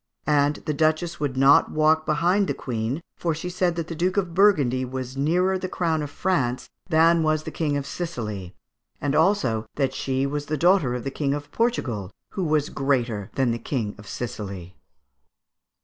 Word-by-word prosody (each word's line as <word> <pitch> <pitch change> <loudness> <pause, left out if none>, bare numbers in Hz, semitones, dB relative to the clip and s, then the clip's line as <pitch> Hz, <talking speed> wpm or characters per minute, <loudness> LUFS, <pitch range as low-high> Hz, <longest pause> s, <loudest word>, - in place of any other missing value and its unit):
And 145 0 +3
the 155 - 0
Duchess 155 +3 0
would 140 -3 -2
not 135 +2 +6
walk 155 +1 +2
behind 175 +6 +2
the - - -1
Queen, 120 +5 -3
for 165 -2 -1
she 180 +3 -5
said 175 -1 0
that 165 -2 -3
the 170 - -5
Duke 180 +4 -1
of 180 -4 0
Burgundy 150 -10 +4
was 130 0 -5
nearer 180 +7 +1
the 185 0 -4
crown 165 -4 0
of 145 - -4
France 140 -7 -1 0.2
than 165 0 +5
was 155 -1 +1
the - - -6
King 150 -3 -1
of 140 - -3
Sicily, 105 - -5 0.4
and 140 0 -1
also 150 - +2
that 135 -2 0
she 135 0 -1
was 145 +1 -3
daughter 155 -3 +3
of 125 - -4
the 135 - -3
King 140 0 -1
of 145 0 -7
Portugal, 125 - -1 0.2
who 190 - -3
was 155 -2 +1
greater 120 -7 -1
than 130 -3 +2
the 115 - -2
King 115 -4 -2
of 105 - -12
Sicily." 100 -6 -6
145 Hz, 180 wpm, -24 LUFS, 130-170 Hz, 0.4 s, not